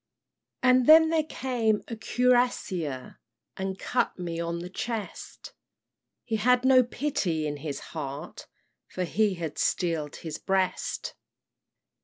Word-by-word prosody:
"And 255 -1 +5
then 320 +1 +8
there 325 -1 +3
came 230 -5 0
a 230 - -5
cuirassier 225 - 0 0.4
And 190 0 -4
cut 245 +4 -1
me 170 -2 -4
on 170 0 -2
the 175 +1 -6
chest; 225 0 -6 0.7
He 225 -2 -1
had 250 +3 +3
no 260 -1 +7
pity 220 - -1
in 145 -1 -3
his 145 -1 -5
heart, 150 +1 -6 0.4
For 185 - -4
he 205 +2 +1
had 165 -4 -5
steel'd 165 -4 0
his 160 -2 -6
breast. 190 -1 -1
195 Hz, 125 wpm, -27 LUFS, 165-250 Hz, 0.7 s, then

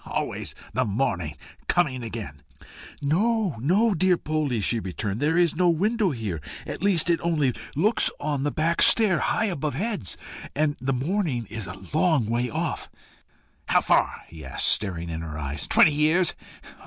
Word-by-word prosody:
always - - -4 0.2
the - - +1
morning 95 - -1 0.3
coming 140 -8 +1
again!" 110 - -7 0.6
"No, 200 - +1
no, 200 - +3
dear 185 0 +3
Poldie!" 150 -7 -1
she 115 +3 +1
returned. 100 +2 -4
"There 155 +4 +1
is 175 -3 +3
no 180 +1 +3
window 205 +5 +2
here 110 - -4 0.2
at - - -6
least 190 -5 +2
it 170 -1 +2
only 150 -7 +1 0.2
looks 210 - +2
on 145 -3 -2
the 145 - +1
back 160 +5 0
stair, 205 -7 +5
high 215 - +1
above 155 - -1
heads; 205 - -2 0.4
and 150 0 +1
the 135 +1 0
morning 140 - -1
is 110 -4 -5
a 95 - -7 0.2
long 155 -6 +3
way 120 +3 -1
off." - - -3 0.8
"How - - +4
far?" - - +1
he 80 -1 -11
asked, - - -2
staring 85 -5 +1
in 80 0 -4
her 80 -2 -6
eyes 70 -1 -4
"twenty 150 - +5
years? 155 +4 +2
145 Hz, 165 wpm, -25 LUFS, 110-175 Hz, 0.8 s, stair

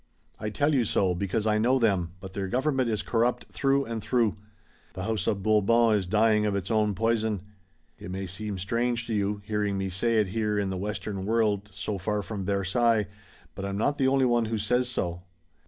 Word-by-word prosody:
I 105 - -3
tell 145 +8 +1
you 130 -4 +3
so, 95 -3 +1
because 100 +4 -1
I 110 0 +2
know 125 +4 +3
them, 95 -8 +1
but 95 -1 -9
their 95 -1 -3
government 130 +2 +1
is 110 -2 -1
corrupt 120 +1 0
through 140 0 +1
and 115 -1 -4
through. 115 -4 +1 0.6
The 95 - -4
House 110 -2 -1
of 100 -2 0
Bourbon 110 +2 +4
is 100 -4 0
dying 105 +2 +3
of 100 - 0
its 100 +2 -3
own 105 -2 +2
poison. 110 -2 0 0.6
It - - -8
may 95 +1 -4
seem 100 +2 -5
strange 115 +5 -1
to 115 - -3
you, 100 0 -1
hearing 105 -2 -1
me 95 0 -2
say 115 +5 +1
it 105 -3 +2
here 105 0 -1
in 100 -2 0
the - - -2
Western 100 0 -4
world, 105 -2 +1
so 95 +2 -4
far 105 +2 -1
from 100 0 -5
Versailles, 105 +3 +2 0.5
but 95 - -7
I'm 100 0 -3
not 145 +7 0
the 135 - +3
only 135 0 +3
one 120 -2 +2
who 110 0 -2
says 125 +4 +1
so." 90 -7 -2
105 Hz, 205 wpm, -27 LUFS, 100-115 Hz, 0.6 s, Bourbon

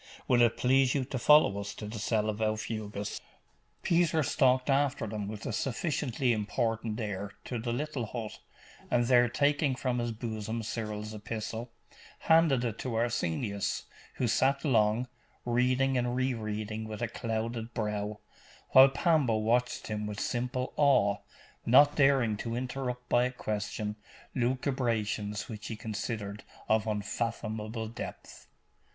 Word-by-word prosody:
Will 120 -1 +4
it 120 -1 +4
please 130 +1 +3
you 135 -2 0
to 130 0 -4
follow 150 -7 +5
us 100 - -6
to 105 - -7
the 105 +1 -6
cell 110 0 +1
of 110 0 -2
Aufugus?' 110 -1 -3 0.6
Peter 170 -2 +3
stalked 130 -1 +3
after 140 -3 +2
them 105 -1 -4
with 105 -1 -7
a - - -2
sufficiently 130 -1 0
important 110 +1 -1
air 100 -2 -4
to 120 - -3
the 120 +1 -3
little 135 -2 -2
hut, 110 -1 -6 0.5
and 120 -1 +2
there 120 -1 +5
taking 145 +2 +2
from 125 -1 -1
his 120 0 -1
bosom 110 0 -4
Cyril's 105 -1 -4
epistle, 110 +2 -5 0.5
handed 160 -6 +4
it 115 -2 -3
to 125 -3 -3
Arsenius, 105 -3 -1 0.3
who 125 - 0
sat 140 +5 +2
long, 115 -2 +3 0.4
reading 125 +2 +2
and 120 0 -1
re 130 0 +1
reading 110 -1 -4
with 110 +1 -5
a - - +1
clouded 115 +1 -3
brow, 105 -2 -2 0.5
while 135 +1 +9
Pambo 135 -5 +2
watched 120 +3 +1
him 105 -1 -3
with 105 0 -5
simple 125 +1 -2
awe, 130 -9 +4 0.5
not 145 +5 +6
daring 135 -7 +3
to 115 +2 -4
interrupt 125 0 -4
by 120 +1 +3
a 125 - -1
question 105 -2 -3 0.4
lucubrations 120 -5 -1
which 105 -2 -7
he 115 - -4
considered 105 -1 -4 0.2
of 110 0 +2
unfathomable 110 +1 -3
depth. 115 - -8
115 Hz, 145 wpm, -30 LUFS, 110-130 Hz, 0.6 s, while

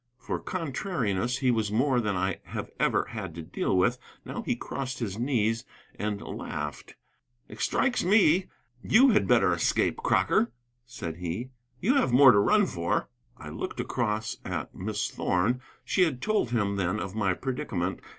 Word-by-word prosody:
For - - -4
contrariness 125 - -2
he 130 -2 +2
was 110 -3 0
more 125 +3 +2
than 105 -3 -1
I 95 +1 -1
have - - -6
ever - - +2
had 80 - -6
to 85 - -6
deal 90 +3 -1
with. 120 +7 +2 0.3
Now - - -5
he - - -1
crossed 130 -1 -5
his 105 -3 -4
knees 115 -3 +1 0.3
and 105 -1 -3
laughed. 75 -1 -6 0.5
"It - - -12
strikes 265 -2 +1
me 185 -2 +4 0.3
you 255 - +5
had 210 - +3
better - - +4
escape, - - +1
Crocker," 345 - +2 0.4
said 85 -10 -6
he. 90 +9 -4 0.3
"You 255 +8 +3
have 265 - +2
more 130 +1 +8
to 100 - +4
run 210 - +4
for." 85 - -1 0.3
I - - -9
looked - - -5
across 110 -3 -1
at - - -4
Miss 105 +2 -2
Thorn. 105 +8 0 0.2
She 190 - +1
had 155 -8 +2
told 215 - 0
him, 100 -4 0
then, 95 +2 0
of 95 -2 -5
my 100 -4 +1
predicament. 95 -8 -3
115 Hz, 165 wpm, -28 LUFS, 100-140 Hz, 0.5 s, more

